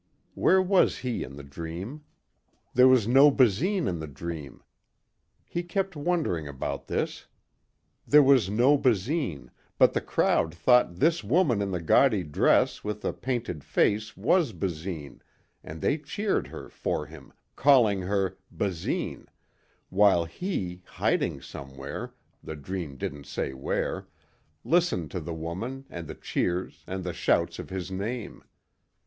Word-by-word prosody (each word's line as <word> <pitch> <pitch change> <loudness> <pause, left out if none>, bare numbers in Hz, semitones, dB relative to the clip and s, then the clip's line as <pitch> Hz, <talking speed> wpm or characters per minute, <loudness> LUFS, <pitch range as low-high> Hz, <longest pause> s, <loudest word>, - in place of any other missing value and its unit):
Where 190 0 +4
was 190 0 +3
he 125 -2 -1
in 70 - -9
the 70 - -9
dream? 85 - -7 0.7
There 125 +1 +7
was 130 -5 +5
no 135 +4 +7
Basine 145 - +2
in 85 -2 -2
the 80 - -5
dream. 75 -1 -7 0.8
He 175 - -3
kept 180 +1 -2
wondering 145 - -1
about 70 -2 -5
this. - - -3 0.8
There 150 0 +7
was 130 -7 +4
no 125 +7 +4
Basine 105 - 0 0.3
but - - +5
the - - 0
crowd 80 +1 +1
thought 125 0 +4
this 160 - +2
woman 125 - +2
in 100 - -1
the 90 -2 -2
gaudy 105 - +4
dress 75 -3 +2
with 105 0 -4
the - - -1
painted 120 - -3
face 105 +1 +1
was 155 - +2
Basine 85 -4 -5 0.4
and 80 0 -9
they 150 - +1
cheered 200 +8 -1
her - - -9
for - - -3
him, - - -13 0.2
calling 120 -8 +4
her, 95 0 -1
"Basine...." 90 -5 -3 0.6
while 95 -3 +4
he, 90 - -4
hiding - - -1
somewhere, 70 0 -8 0.3
the 80 - -6
dream 75 -2 -6
didn't 75 -8 -5
say 70 - -3
where, 65 0 -2 0.6
listened 165 - +1
to 90 - -3
the 85 0 -6
woman 100 +12 -5
and 85 -2 -7
the - - -7
cheers 90 +1 -2
and 95 0 -4
the 90 -1 -3
shouts - - +1
of - - -7
his 95 -1 -5
name. 105 +4 -5
100 Hz, 140 wpm, -27 LUFS, 85-135 Hz, 0.8 s, There